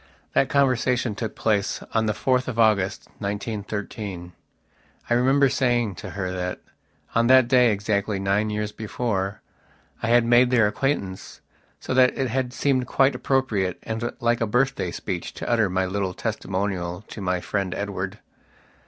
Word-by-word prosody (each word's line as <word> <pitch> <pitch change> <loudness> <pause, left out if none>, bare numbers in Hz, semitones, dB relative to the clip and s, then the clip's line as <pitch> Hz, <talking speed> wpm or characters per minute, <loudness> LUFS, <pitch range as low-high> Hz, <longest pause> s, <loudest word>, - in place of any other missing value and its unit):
that - - +3
conversation 125 -4 +2
took 110 +1 -5
place 105 -3 0
on 110 -1 +2
the 110 - +1
4th 130 +3 +1
of 125 -3 -4
August, 105 -4 +2
1913. 100 -3 -5 0.8
I - - +6
remember 135 +3 +4
saying 120 -5 +1
to - - -7
her 95 -2 -2
that, 90 0 -3 0.5
on 115 0 +3
that 130 -1 +6
day, 125 -2 +5
exactly 105 0 -1
nine 100 +2 +1
years 105 0 -2
before, 105 -2 -3 0.6
I 115 - -1
had 120 0 +4
made 120 +1 +5
their 120 -4 +4
acquaintance, 105 -4 -2 0.4
so - - -4
that 130 -1 +4
it 135 -3 0
had 125 +1 -1
seemed 130 -1 0
quite 135 +2 +3
appropriate 110 -9 0
and 115 +1 -3
like 120 0 +1
a 115 - +1
birthday 125 +5 +1
speech - - -5
to - - -6
utter 115 -4 +2
my 95 +1 0
little 95 -1 -2
testimonial 95 -1 -3
to 105 - -8
my 90 -1 0
friend 95 0 -2
Edward. 100 -1 -4
110 Hz, 155 wpm, -24 LUFS, 100-125 Hz, 0.8 s, I